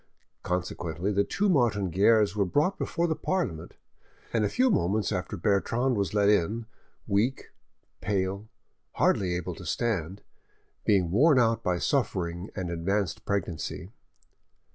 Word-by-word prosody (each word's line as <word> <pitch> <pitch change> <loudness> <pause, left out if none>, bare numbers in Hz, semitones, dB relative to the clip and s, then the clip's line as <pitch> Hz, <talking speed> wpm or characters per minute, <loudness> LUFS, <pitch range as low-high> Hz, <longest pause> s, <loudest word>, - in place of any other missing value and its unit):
Consequently 90 0 -2
the 100 0 +2
two 205 - -1
Martin 115 - +2
Guerres 105 +2 +4
were 105 - +2
brought 150 - +1
before 170 - -1
the 160 -2 0
Parliament, 90 - -3 0.6
and 115 -2 +2
a 105 - +1
few 255 - +2
moments 105 - +1
after 100 +1 -3
Bertrande 115 +7 +1
was 100 -1 -1
led 100 -1 +3
in, 105 +3 +2 0.4
weak, 110 +6 0 0.5
pale, 100 +2 -2 0.4
hardly 90 -3 +1
able 90 0 -3
to 85 - -11
stand, 95 -1 -2 0.6
being 95 -5 +2
worn 140 - +5
out 115 -2 +3
by 90 -1 0
suffering 90 -7 -1
and 90 -3 -3
advanced 95 +3 -2
pregnancy. 90 -1 -3
100 Hz, 135 wpm, -27 LUFS, 90-115 Hz, 0.6 s, worn